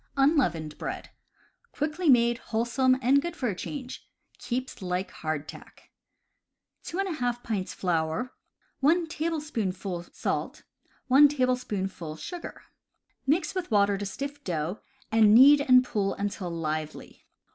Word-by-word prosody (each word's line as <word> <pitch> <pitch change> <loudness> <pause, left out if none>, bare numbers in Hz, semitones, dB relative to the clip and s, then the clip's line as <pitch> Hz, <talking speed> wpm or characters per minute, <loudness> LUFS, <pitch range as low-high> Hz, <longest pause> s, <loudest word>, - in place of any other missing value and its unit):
Unleavened 215 - +1
Bread. - - -5 0.3
— 475 - -38
Quickly 305 +3 -1
made, 235 -2 +4
wholesome, 250 +3 +1
and 275 +3 +4
good 345 +2 -5
for 260 -8 -1
a 195 - -3
change. 260 +5 -7 0.3
Keeps 255 -1 -4
like 180 +1 -2
hardtack. 155 -1 -7 0.9
2^ 310 -11 -2
pints 205 -5 -3
flour, 165 +6 -1 0.5
1 330 +5 +3
tablespoonful 240 - -3
sait, - - -3 0.4
1 280 +3 +7
" 215 - -2
sugar. 350 - -8 0.7
Mix 315 +6 +1
with 370 -2 -3
water 205 -2 +3
to 200 +1 -4
stiff 280 +8 -6
dough, 170 +2 -3 0.3
and 220 -1 +6
knead 280 +4 +8
and 255 -2 +6
pull 205 -5 -1
until 200 -2 -3
lively. 155 -2 -5
240 Hz, 120 wpm, -27 LUFS, 185-285 Hz, 0.9 s, knead